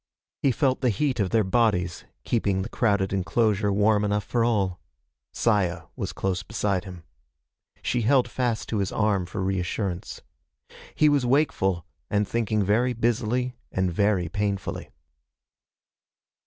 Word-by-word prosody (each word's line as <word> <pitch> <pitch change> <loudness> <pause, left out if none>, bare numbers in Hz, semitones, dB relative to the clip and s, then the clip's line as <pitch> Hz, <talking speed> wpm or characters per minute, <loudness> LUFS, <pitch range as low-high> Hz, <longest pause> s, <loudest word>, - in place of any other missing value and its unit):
He 135 - +3
felt 130 +2 +1
the 125 - +3
heat 130 +3 0
of 100 -3 +1
their 110 +1 +3
bodies, 95 -5 +1 0.2
keeping 100 -5 0
the - - -6
crowded 100 -6 +1
enclosure 105 +1 +1
warm 105 +1 +3
enough 105 0 0
for 120 -2 0
all. 100 -6 +1 0.5
Saya 95 -7 +1
was - - -4
close 95 -2 -2
beside 100 -4 -1
him. 90 -3 -9 0.8
She 120 - 0
held 125 +3 +3
fast 120 -4 -2
to 110 - -1
his 100 -1 -1
arm 105 -4 +1
for 95 +1 -4
reassurance. 95 0 -3 0.7
He 155 - +4
was 145 -3 +3
wakeful, 120 - +1 0.2
and 105 -1 +1
thinking 110 -1 0
very 115 +6 +2
busily 120 +2 0
and 95 -2 0
very 100 -2 +2
painfully. 100 +2 -3
105 Hz, 140 wpm, -25 LUFS, 95-120 Hz, 0.8 s, He